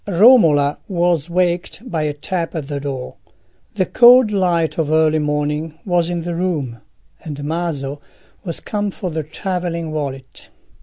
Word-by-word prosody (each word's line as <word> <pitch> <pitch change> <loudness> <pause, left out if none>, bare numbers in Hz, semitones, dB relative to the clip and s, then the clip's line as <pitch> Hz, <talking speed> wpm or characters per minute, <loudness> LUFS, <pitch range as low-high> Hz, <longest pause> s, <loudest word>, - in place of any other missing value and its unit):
Romola 170 - +5
was 175 -4 0
waked 175 +3 -1
by 165 -8 -2
a 150 -1 -1
tap 170 +3 -4
at 150 -4 -4
the 145 -1 -3
door. 135 -3 -5 0.6
The 190 -3 +1
cold 245 0 +6
light 175 -5 +1
of 155 -2 0
early 155 0 +3
morning 150 +1 -2
was 175 -3 +1
in 175 -1 -2
the 175 0 -3
room, 155 -10 -2 0.4
and 145 -2 -6
Maso 145 -3 -3 0.4
was 170 -5 -5
come 205 -1 -2
for 185 -2 -5
the 160 0 -2
travelling 170 0 -4
wallet. 135 -4 -6
165 Hz, 150 wpm, -19 LUFS, 150-180 Hz, 0.6 s, cold